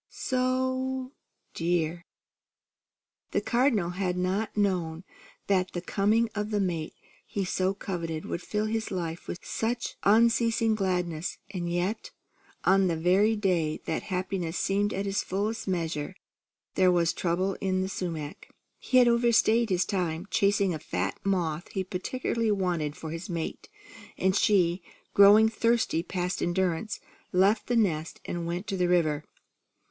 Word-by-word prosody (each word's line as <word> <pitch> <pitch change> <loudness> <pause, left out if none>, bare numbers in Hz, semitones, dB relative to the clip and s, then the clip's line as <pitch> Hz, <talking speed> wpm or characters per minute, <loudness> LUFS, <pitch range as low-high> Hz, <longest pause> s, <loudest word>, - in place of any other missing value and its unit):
So 260 0 -1 0.4
dear!" 170 0 -1 1.3
The - - +3
Cardinal 235 -8 +2
had 180 0 -2
not 190 +5 -1
known 180 -5 0 0.4
that 185 -2 +1
the 175 - -3
coming 215 +5 +2
of 210 0 -2
the 210 -1 0
mate 170 -5 -2 0.3
he 200 -2 -2
so 185 +1 0
coveted 170 -5 -4
would 170 - -4
fill 210 +3 -2
his 220 0 -2
life 170 -3 -4
with 175 - -6
such 235 +2 -2
unceasing 230 +1 +3
gladness, 180 -5 -1
and 175 -3 -3
yet, 185 - -1 0.5
on 190 0 +4
the 170 -2 0
very 190 +7 +3
day 175 -7 0
that 160 - -1
happiness 185 -2 -2
seemed 205 +1 +1
at 195 +1 -2
fullest 205 +4 -2
measure, 170 -2 -2 0.6
there 185 -1 +4
was 170 -1 +2
trouble 185 +2 0
in 185 -1 +1
the 190 - -1
sumac. 165 -6 -5 0.3
He 255 - +1
had 250 -1 +7
overstayed 235 -1 +3
his 185 -1 +2
time, 175 -3 -2
chasing 200 -2 +2
a 155 - -4
fat 90 -7 -3
moth 175 -4 -1
he 190 - -1
particularly 225 +5 -2
wanted 175 -7 0
for 160 - -7
his 165 +5 -6
mate, 165 -2 -4 0.5
and 190 0 +2
she, 185 -4 +3 0.3
growing 205 +2 +8
thirsty 230 -6 +1
past 180 +1 -3
endurance, 185 +3 -1 0.3
left 195 +4 +3
the 245 - +1
nest 170 -8 0
and 170 -1 -3
went 175 +3 -3
to 195 - -3
the 180 -1 +2
river. 160 -4 +2
185 Hz, 140 wpm, -28 LUFS, 175-210 Hz, 1.3 s, growing